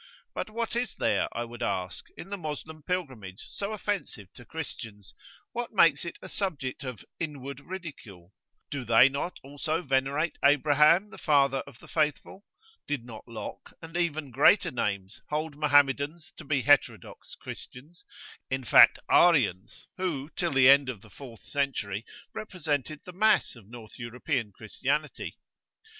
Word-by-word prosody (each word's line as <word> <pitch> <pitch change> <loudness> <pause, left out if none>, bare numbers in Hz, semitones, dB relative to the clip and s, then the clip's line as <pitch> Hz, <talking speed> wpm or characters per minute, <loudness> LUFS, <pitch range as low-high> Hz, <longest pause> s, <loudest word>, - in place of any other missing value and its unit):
But - - -4
what 230 +1 -3
is 240 -2 -1
there, - - +1
I 120 - -3
would 120 0 -11
ask, 90 0 -2
in 180 - -9
the - - -1
Moslem 155 -1 -6
Pilgrimage 130 - -4
so 200 +1 -4
offensive 200 - -4
to - - -13
Christians 105 -3 -8 0.4
what 240 -1 -4
makes 165 -7 +5
it 170 - -6
a - - -7
subject 145 -9 -3
of 125 -5 -7
"inward 140 -4 -5
ridicule"? 140 - -9 0.4
Do 140 -2 -3
they 120 +3 +6
not 140 +6 -4
also 150 +4 -3
venerate 135 +4 0
Abraham, 150 +7 +5
the - - -11
Father 140 -3 +3
of 140 -4 -13
the - - -16
Faithful? 155 +5 -1 0.4
Did 140 -5 -2
not 115 -1 -10
Locke, 110 -3 -8
and 165 0 -11
even 155 -5 -1
greater 145 - +5
names, 105 0 -3
hold 155 0 -2
Mohammedans 145 +1 +2
to - - -9
be 140 -4 0
heterodox 145 -1 +1
Christians, 150 +8 -11 0.5
in 130 0 -2
fact 120 - +7
Arians 115 - +3
who, 165 -6 -3
till 170 -2 -1
the 135 -1 +6
end 140 -1 +7
of 115 -6 -6
the 110 - -17
fourth 120 -3 -12
century, 115 -8 -2 0.3
represented 155 - -3
the 180 - -9
mass 215 -2 +3
of 110 -5 -16
North 115 +1 -12
European 120 -1 -2
Christianity? - - -3
140 Hz, 150 wpm, -28 LUFS, 120-165 Hz, 0.5 s, fact